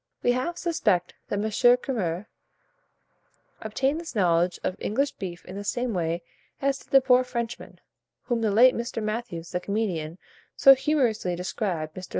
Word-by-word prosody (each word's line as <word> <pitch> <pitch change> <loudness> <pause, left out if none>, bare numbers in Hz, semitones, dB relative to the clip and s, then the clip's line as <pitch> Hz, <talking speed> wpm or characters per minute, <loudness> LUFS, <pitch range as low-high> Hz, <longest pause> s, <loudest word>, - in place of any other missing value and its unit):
We 245 - +4
half 255 +8 -2
suspect 255 - 0
that 205 - -2
M. 205 - -1 0.3
Curmer 200 -8 -3 1.4
obtained 265 +8 -1
his 335 -6 -8
knowledge 175 -2 +2
of 185 - -1
English 275 +7 0
beef 175 -2 -7
in 185 - -9
the 200 - -5
same 240 +3 -2
way 170 -1 -1 0.4
as 275 0 0
did - - -19
the 270 - +6
poor 255 -1 +4
Frenchman, 240 -2 -5 0.4
whom 240 -2 -1
the 220 - +2
late 245 +5 +6
Mr. 235 -1 -4
Mathews, 215 -6 -4
the 180 - -1
comedian, 180 -5 -2 0.4
so 275 - +8
humorously 250 - 0
described. 175 -3 -3
Mr. 185 -1 -8
215 Hz, 155 wpm, -26 LUFS, 180-255 Hz, 1.4 s, so